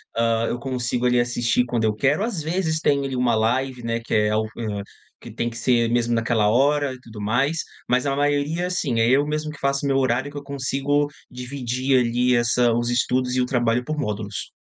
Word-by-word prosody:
Hã, 115 0 +1
eu 120 - -3
consigo 125 -1 -2
ali 125 0 +3
assistir 120 0 +1
quando 120 -2 -1
eu 105 - +1
quero. 140 - +1
Às 195 -10 -3
vezes, 160 -1 -1
tem 140 -3 +2
ali 135 -1 -3
uma 125 -1 +2
live, 125 +3 0
né, 115 0 -1
que 115 - -6
é 105 0 +2
o 110 - +1
hã, 105 -3 -3 0.4
que - - -11
tem 120 - -2
que 115 - -9
ser 120 0 +2
mesmo 120 0 +1
naquela 115 -2 +1
hora 140 +3 +2
e 130 - -11
tudo 115 -4 -12
mais. 135 +10 0 0.3
Mas 125 +2 +2
a 135 - 0
maioria 145 +5 0
sim, 140 -10 -1
é 115 +1 +3
eu 140 +3 +4
mesmo 150 +1 -2
que 150 - -12
faço 140 +1 0
o - - +1
meu 135 -1 +2
horário. 130 +1 +1
Que 145 - -8
eu 145 - -6
consigo 140 +1 0 0.2
dividir 130 +1 -1
ali 125 +1 +2
essa 120 0 +3
os 120 +1 0
estudos 125 +1 +1
e 130 - +2
o - - +2
trabalho 120 -1 +1
por 155 +4 -4
módulos. 105 -4 -4
125 Hz, 220 wpm, -23 LUFS, 115-140 Hz, 0.4 s, eu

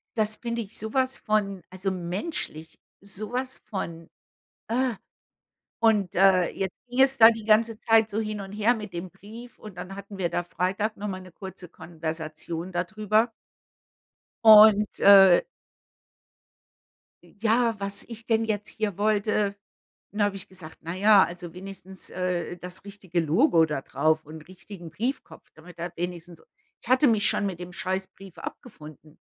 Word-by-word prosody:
das 215 -1 +1
finde 235 -1 -3
ich 210 0 -6
sowas 260 +5 0
von, 200 -3 -1
also, 190 +1 -3
menschlich, 180 - -4 0.2
so 200 +3 -6
was 255 +1 -3
von 170 -6 -6 0.6
äh. 250 +1 0 0.9
Und 210 -5 +3
,äh, 185 -1 +4
jetzt 190 -2 -4
ging 245 +2 +1
es 270 0 +4
da 225 +1 +9
die 225 -1 -6
ganze 220 +1 +2
Zeit 225 -1 +4
so 215 - -1
hin 215 -1 -3
und 195 -1 -8
her 215 +4 +2
mit 210 -4 -8
dem 175 +2 -5
Brief 225 +7 -13
und 210 -4 -12
dann 190 +2 -7
hatten 200 0 -10
wir 175 -2 0
da 175 - -2
Freitag 190 +5 -2
nochmal 200 -2 -5
'ne 185 -1 -13
kurze 190 -1 -10
Konversation 160 +1 -6
da 175 - -1
drüber. 215 +2 +1 1.1
Und, 215 -1 +8
äh 195 -3 +8 1.8
i - - -21
ja, 230 +1 +2
was 200 0 -2
ich 230 -1 -10
denn 225 -1 +2
jetzt 210 -1 -2
hier 215 -4 -3
wollte. 210 -1 +1 0.5
Dann 210 0 -2
habe 200 -1 -1
ich 195 +1 -9
gesagt: 175 -4 -11
„Na 170 +2 -5
ja, 205 0 +6
also 175 -1 -8
wenigstens, 190 0 -10
äh, 180 -1 -3
das 180 +1 -9
richtige 195 -4 -3
Logo 165 - +3
da 150 -3 -3
drauf 155 +2 0
und 155 +2 -12
richtigen 185 -2 -11
Briefkopf, 240 - -5
damit 175 +3 -15
er 170 0 -5
wenigstens“ 175 -1 -6 0.4
ich - - -12
hatte 255 +3 +4
mich 215 -2 +3
schon - - +1
mit 180 -3 -5
dem 180 0 -8
scheiß 190 +1 -3
Brief 190 -1 -15
abgefunden. 155 - -11
195 Hz, 160 wpm, -26 LUFS, 175-215 Hz, 1.8 s, da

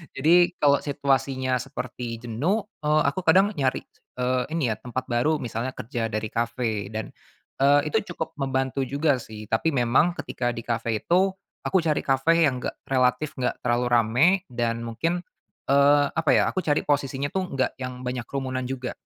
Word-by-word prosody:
Jadi 175 +5 +4
kalau 140 -1 +5
situasinya 135 -2 0
seperti 125 -2 -5
jenuh, 150 - 0 0.2
eee, 155 0 +2
aku 140 +6 0
kadang 190 +2 +4
nyari, 135 -9 -1 0.3
eee, 125 0 0
ini 135 -9 +1
ya 110 - -4
tempat 125 +1 -4
baru, 145 +6 +1
misalnya 120 +2 -4
kerja 115 -1 -3
dari 110 0 -3
kafe 115 -2 -2
dan, 110 -1 -5 0.5
eee, 145 +2 +4
itu 200 -5 -1
cukup 160 - -4
membantu 135 0 -1
juga 140 0 +1
sih, 110 -2 -9
tapi 115 +9 +2
memang 130 +8 +3
ketika 120 -1 -2
di 115 - -6
kafe 115 -1 -1
itu 185 +3 +3 0.4
aku 190 - +2
cari 155 -2 +1
kafe 135 +4 +2 0.2
yang 130 -3 -1
enggak - - -3
relatif 130 +3 +1
enggak 125 - -1
terlalu 120 +1 +1
ramai, 120 +7 +4 0.2
dan 115 -1 -1
mungkin, 165 +10 -2 0.5
eee, 145 +1 +5
apa 160 -2 -1
ya, - - +4
aku - - -2
cari 150 -5 +1
posisinya 140 -1 -1
tuh 190 -1 -1
enggak 130 - +1
yang 125 -1 -6
banyak 125 -1 -3
kerumunan 130 -2 -3
juga, 130 -1 -4
130 Hz, 170 wpm, -25 LUFS, 120-150 Hz, 0.5 s, kalau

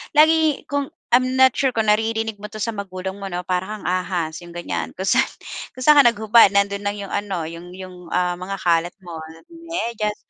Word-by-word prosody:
lagi 315 -1 +4
kung 285 -1 0 0.2
I'm 255 +1 +3
not 260 -1 +6
sure 265 +1 0
kung 220 -2 +3
naririnig 220 0 0
mo 210 - -7
'to 215 -1 -6
sa 230 - -1
magulang 190 -1 -6
mo 195 - -5
'no, 180 -1 -4
"Para 185 +4 -2
kang 210 - -11
ahas." 180 -3 -2
'yong 175 0 -13
ganyan. 175 - -4
Kung 190 +1 -4
sa'n - - +4 0.5
kung 255 - -6
sa'n 300 0 +7
ka - - +9
naghubad 220 -1 +5
nando'n 200 0 +1
lang 205 0 -1
'yong 200 -1 -7
ano, 195 -5 -2
'yong 170 +2 -8
'yong, 185 -1 -9 0.2
ah, 180 0 0
mga 195 +2 -4
kalat 170 0 +1
mo, 170 -2 -8 0.3
medyas 235 -11 -3
200 Hz, 205 wpm, -21 LUFS, 180-230 Hz, 0.5 s, ka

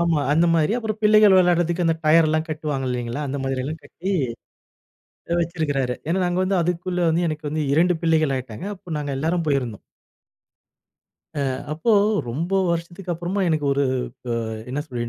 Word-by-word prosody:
ஆமா. 170 -3 +2
அந்தமாரி 165 +2 +3
அப்புறம் 220 -2 -3
பிள்ளைகள் 210 -2 +6
விளையாடுறதற்கு 175 -1 +3
அந்த 165 - +3
டயர்லாம் 155 0 +4
கட்டுவாங்க 150 -4 -3
இல்லேங்களா, 120 +2 -3
அந்தமாதிரி 135 -1 -2
எல்லாம் 155 +3 -5
கட்டி, 190 +3 -5 1.2
அ - - +1
வச்சிருக்காரு. 145 -7 -1
ஏன்னா, 180 +3 +1
நாங்க 175 +1 0
வந்து 190 0 +1
அதுக்குள்ள 180 +1 -2
வந்து 170 +2 +1
எனக்கு 150 -1 -4
வந்து 155 0 -1
2 175 +2 +3
பிள்ளைகள் 155 -4 +2
ஆகிட்டாங்க. 130 - -6
அப்ப 170 -4 -6
நாங்க 145 -1 -3
எல்லாரும் 165 +2 0
போயிருந்தோம். 125 -7 -1 1.6
ஆ. 145 - -1 0.3
அப்போ 160 +9 -1 0.4
ரொம்ப 160 +10 -3 0.2
வருஷத்துக்கு 170 +2 -3
அப்புறமா 175 +4 -3
எனக்கு 155 -3 0
ஒரு 140 +1 +1 0.5
அ - - +1 0.4
என்ன 145 - -2
சொல்ல 120 -4 -4
160 Hz, 150 wpm, -23 LUFS, 145-175 Hz, 1.6 s, பிள்ளைகள்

